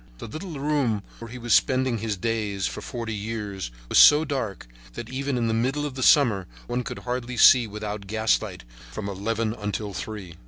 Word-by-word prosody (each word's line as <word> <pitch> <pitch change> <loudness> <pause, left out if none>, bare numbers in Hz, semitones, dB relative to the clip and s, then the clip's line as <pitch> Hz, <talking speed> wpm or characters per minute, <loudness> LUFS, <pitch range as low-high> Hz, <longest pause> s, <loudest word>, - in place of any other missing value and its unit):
The - - -8
little 155 - -7
room 135 -8 0 0.2
where 115 - -8
he 120 - -9
had 125 - -9
been 120 - -3
spending 130 -1 +3
his 110 -2 -2
days 105 -2 -2
for - - -4
forty 115 -2 -5
years 105 - -4 0.2
was - - +4
so 150 +2 +8
dark 130 -9 -3 0.3
that 120 -1 -7
even 135 0 -2
in 115 -1 0
the 110 - 0
middle 130 +6 0
of 135 -2 -4
summer 115 - +4 0.2
one 125 +1 -2
could - - -6
hardly 125 0 -3
see 120 -1 +7
without 105 -1 -6
gaslight 110 - 0 0.3
from 100 +10 -5
eleven 110 +3 -2
until 105 -1 -4
three. 95 -5 -7
115 Hz, 190 wpm, -25 LUFS, 105-130 Hz, 0.3 s, so